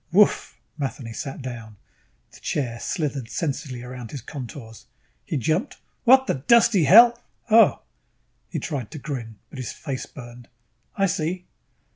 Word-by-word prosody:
"Whoof!" 205 Hz, +4 st, +3 dB, 0.2 s
Matheny 130 Hz, -4 st, -4 dB
sat 135 Hz, +3 st, -6 dB
down. 115 Hz, -4 st, -7 dB, 0.6 s
The -, -, -15 dB
chair 120 Hz, -5 st, -2 dB
slithered 140 Hz, -6 st, -3 dB
sensuously 135 Hz, -5 st, -3 dB
about 125 Hz, -2 st, -8 dB
his 140 Hz, -, -7 dB
contours. 125 Hz, -5 st, -9 dB, 0.4 s
He -, -, -2 dB
jumped. 155 Hz, -, -1 dB, 0.3 s
"What 265 Hz, +2 st, +7 dB
the -, -, +1 dB
dusty 200 Hz, -, +4 dB
hell 235 Hz, -, +8 dB, 0.3 s
Oh." 225 Hz, +1 st, +6 dB, 0.7 s
He -, -, -4 dB
tried 135 Hz, -9 st, -4 dB
to -, -, -8 dB
grin, 125 Hz, -6 st, -6 dB
but 135 Hz, -, -9 dB
his 125 Hz, -, -4 dB
face 135 Hz, -4 st, -5 dB
burned. 120 Hz, -2 st, -12 dB, 0.5 s
"I 195 Hz, -, +3 dB
see." 175 Hz, 0 st, -2 dB
140 Hz, 140 wpm, -24 LUFS, 120-175 Hz, 0.7 s, hell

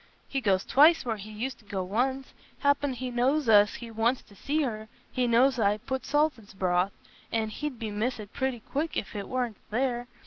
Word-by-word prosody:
He 270 Hz, -, -2 dB
goes 195 Hz, -5 st, +2 dB
twice 305 Hz, +2 st, +5 dB
where 225 Hz, -3 st, -1 dB
he 205 Hz, +1 st, -9 dB
used 235 Hz, +4 st, -4 dB
t' 215 Hz, -, -21 dB
go 195 Hz, -2 st, -2 dB
once. 255 Hz, +8 st, -1 dB, 0.3 s
Happen 285 Hz, -1 st, +2 dB
he 250 Hz, 0 st, -4 dB
knowsna 245 Hz, -3 st, +5 dB
as 205 Hz, -, -3 dB
he 235 Hz, -2 st, -8 dB
wants 230 Hz, +3 st, +1 dB
t' -, -, -19 dB
see 295 Hz, +10 st, -1 dB
her; 220 Hz, -4 st, -3 dB, 0.2 s
he 250 Hz, -1 st, +1 dB
knowsna 235 Hz, +3 st, +5 dB
as 265 Hz, -3 st, -3 dB
I 205 Hz, -1 st, +3 dB
put 260 Hz, +4 st, -4 dB
salt 295 Hz, -3 st, +2 dB
in's 200 Hz, -3 st, -16 dB
broth, 185 Hz, 0 st, +1 dB, 0.4 s
but 220 Hz, -1 st, 0 dB
he'd 275 Hz, +1 st, -5 dB
miss 220 Hz, +2 st, -2 dB
it 205 Hz, -1 st, -9 dB
pretty 260 Hz, -3 st, -2 dB
quick 300 Hz, +8 st, -2 dB
if 195 Hz, -, -4 dB
it 200 Hz, -1 st, -4 dB
warna 250 Hz, -3 st, -1 dB, 0.2 s
there. 245 Hz, +1 st, -1 dB
240 Hz, 210 wpm, -28 LUFS, 215-265 Hz, 0.4 s, twice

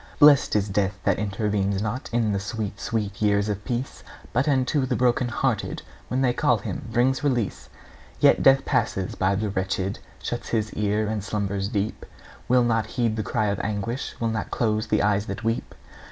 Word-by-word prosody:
Blest 145 Hz, -5 st, +6 dB
is 105 Hz, -1 st, +2 dB
death 100 Hz, -1 st, 0 dB
that -, -, +2 dB
intervenes 100 Hz, -1 st, 0 dB
not 110 Hz, +5 st, -3 dB
In 115 Hz, -2 st, +1 dB
the 100 Hz, -, 0 dB
sweet, 105 Hz, 0 st, -4 dB
sweet 105 Hz, -4 st, -3 dB
years 100 Hz, 0 st, +2 dB
of 105 Hz, 0 st, -3 dB
peace, 120 Hz, +3 st, -3 dB, 0.3 s
But 125 Hz, +5 st, +1 dB
unto 135 Hz, 0 st, +2 dB
the 125 Hz, -, 0 dB
broken 125 Hz, 0 st, +2 dB
hearted, 120 Hz, -2 st, -1 dB, 0.2 s
When 130 Hz, +1 st, -1 dB
they 125 Hz, -2 st, +3 dB
call -, -, +2 dB
him, -, -, -5 dB
brings 130 Hz, +4 st, +2 dB
release! 125 Hz, -8 st, -1 dB, 0.5 s
Yet -, -, +5 dB
Death 135 Hz, 0 st, +5 dB
passes 95 Hz, -1 st, 0 dB
by 95 Hz, +1 st, +1 dB
the 105 Hz, +1 st, -1 dB
wretched, 95 Hz, 0 st, -2 dB, 0.2 s
Shuts -, -, -4 dB
his 110 Hz, -2 st, -1 dB
ear 105 Hz, +1 st, 0 dB
and 105 Hz, -2 st, -2 dB
slumbers 100 Hz, -1 st, -2 dB
deep; 105 Hz, -1 st, -2 dB, 0.4 s
Will 125 Hz, 0 st, +4 dB
not 115 Hz, -2 st, +1 dB
heed 115 Hz, -1 st, 0 dB
the 110 Hz, -, -1 dB
cry 110 Hz, +2 st, -1 dB
of 100 Hz, -, -1 dB
anguish, 110 Hz, +5 st, -3 dB
Will 115 Hz, -, 0 dB
not 110 Hz, -2 st, -3 dB
close 110 Hz, -2 st, 0 dB
the 110 Hz, -1 st, +2 dB
eyes 105 Hz, 0 st, +1 dB
that 100 Hz, +3 st, -5 dB
weep. 115 Hz, +1 st, -2 dB
110 Hz, 185 wpm, -25 LUFS, 100-120 Hz, 0.5 s, Blest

